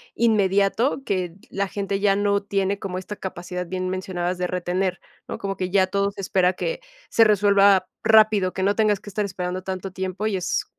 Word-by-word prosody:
inmediato, 215 Hz, +4 st, +2 dB
que 180 Hz, -3 st, -2 dB
la 195 Hz, 0 st, -2 dB
gente 200 Hz, -1 st, -2 dB
ya 200 Hz, -1 st, +3 dB
no 200 Hz, 0 st, +1 dB
tiene, 200 Hz, 0 st, -1 dB
como 185 Hz, -2 st, -5 dB
esta 195 Hz, +3 st, -6 dB
capacidad, 180 Hz, -1 st, -5 dB
bien 185 Hz, +1 st, -3 dB
mencionabas, 185 Hz, -1 st, -3 dB
de 180 Hz, 0 st, -1 dB
retener, 180 Hz, +1 st, -1 dB, 0.3 s
¿no? -, -, -4 dB
Como 195 Hz, -1 st, -4 dB
que 185 Hz, -1 st, -3 dB
ya 190 Hz, -1 st, +3 dB
todo, 200 Hz, +1 st, 0 dB
se 200 Hz, -, -14 dB
espera 185 Hz, -1 st, +2 dB
que -, -, -3 dB, 0.3 s
se 225 Hz, -, +5 dB
resuelva 200 Hz, -2 st, +4 dB, 0.2 s
rápido, 215 Hz, -4 st, +5 dB
que 190 Hz, -, -2 dB
no 200 Hz, +1 st, +2 dB
tengas 210 Hz, -3 st, +2 dB
que 205 Hz, -, -11 dB
estar 210 Hz, +1 st, -2 dB
esperando 185 Hz, -1 st, -4 dB
tanto 190 Hz, 0 st, -5 dB
tiempo, 190 Hz, +3 st, -3 dB
y 205 Hz, -, -1 dB
es 180 Hz, -, -1 dB
195 Hz, 195 wpm, -23 LUFS, 185-205 Hz, 0.3 s, se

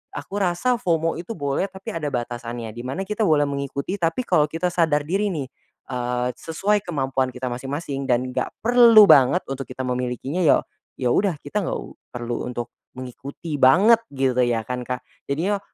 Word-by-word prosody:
aku 200 Hz, -, -5 dB
rasa 195 Hz, +7 st, +1 dB
FOMO 165 Hz, -3 st, 0 dB
itu 180 Hz, +7 st, -6 dB
boleh 140 Hz, +3 st, -1 dB
tapi 190 Hz, -1 st, -8 dB
ada 160 Hz, -3 st, -3 dB
batasannya 120 Hz, -3 st, -4 dB
di 115 Hz, -, -10 dB
mana 160 Hz, +9 st, -3 dB
kita 210 Hz, +2 st, -1 dB
boleh 150 Hz, -2 st, +4 dB
mengikuti 140 Hz, +6 st, -3 dB
tapi 170 Hz, +9 st, 0 dB
kalau 150 Hz, -10 st, +3 dB
kita 165 Hz, +4 st, -2 dB
sadar 160 Hz, -4 st, +2 dB
diri 195 Hz, +7 st, 0 dB
nih, 155 Hz, -9 st, -3 dB, 0.4 s
eee, 125 Hz, 0 st, -1 dB
sesuai 200 Hz, +6 st, 0 dB
kemampuan 135 Hz, -5 st, 0 dB
kita 125 Hz, 0 st, -4 dB
masing-masing 135 Hz, +2 st, -4 dB
dan 125 Hz, +1 st, +1 dB
gak -, -, -3 dB
perlu 235 Hz, -2 st, +8 dB
banget 140 Hz, -2 st, +6 dB
untuk 135 Hz, 0 st, -5 dB
kita 130 Hz, +1 st, -6 dB
memilikinya 125 Hz, +5 st, -2 dB
ya, 170 Hz, -5 st, +4 dB, 0.3 s
ya 125 Hz, -2 st, 0 dB
udah 195 Hz, +1 st, +2 dB
kita 145 Hz, +9 st, -2 dB
nggak -, -, -1 dB
u -, -, -14 dB
perlu 120 Hz, -1 st, -4 dB
untuk 120 Hz, -1 st, -5 dB, 0.2 s
mengikuti 140 Hz, +4 st, -7 dB
banget 195 Hz, -, +6 dB, 0.2 s
gitu 130 Hz, -2 st, +1 dB
ya 120 Hz, -2 st, +2 dB
kan 125 Hz, +2 st, -4 dB
Kak. 125 Hz, 0 st, -3 dB, 0.2 s
Jadinya 180 Hz, +9 st, 0 dB
140 Hz, 175 wpm, -23 LUFS, 125-180 Hz, 0.4 s, perlu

